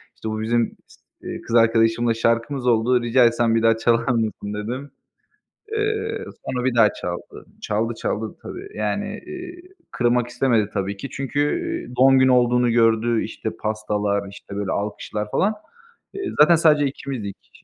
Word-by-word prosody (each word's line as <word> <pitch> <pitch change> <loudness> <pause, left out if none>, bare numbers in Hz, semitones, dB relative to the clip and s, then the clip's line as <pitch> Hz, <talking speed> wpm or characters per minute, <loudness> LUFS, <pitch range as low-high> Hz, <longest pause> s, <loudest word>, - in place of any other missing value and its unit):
işte 110 - -6
bu 110 0 -3
bizim 115 +1 0
s - - -21 0.2
eee, - - -6
kız 115 - -3
arkadaşımla 115 0 +3
şarkımız 115 +3 0
oldu, 120 +2 +3
rica 120 +1 +4
etsem 115 -1 +2
bir 115 - +2
daha 115 0 +4
çalar 115 0 +1
mısın?" 110 -3 -1
dedim. 125 +7 -5 0.8
Eee, 435 +1 -1 0.2
sonra 125 -1 -2
bir 130 -2 +1
daha 115 -3 +5
çaldı. 90 0 -7 0.2
Çaldı, 110 +3 -1
çaldı 110 0 -3
tabii. 385 +2 -8
Yani, - - -2
eee, 360 -1 -8 0.3
kırmak 120 0 +1
istemedi 120 -4 +1
tabii 100 0 -2
ki 140 - -7
çünkü, 135 +1 -4 0.4
eee, 125 - -10
doğum 135 +1 +6
günü 130 0 +5
olduğunu 125 -1 +3
gördü. 115 0 +3
İşte, - - -5
pastalar, 105 -2 -1
işte, 100 0 -11
böyle, 100 -1 -2
alkışlar 105 +1 -3
falan. 205 +3 +2 0.6
Eee, 395 0 -4
zaten 170 +3 +7
sadece 155 -3 +4
ikimizdik. 130 -7 -6
115 Hz, 155 wpm, -22 LUFS, 110-130 Hz, 0.8 s, zaten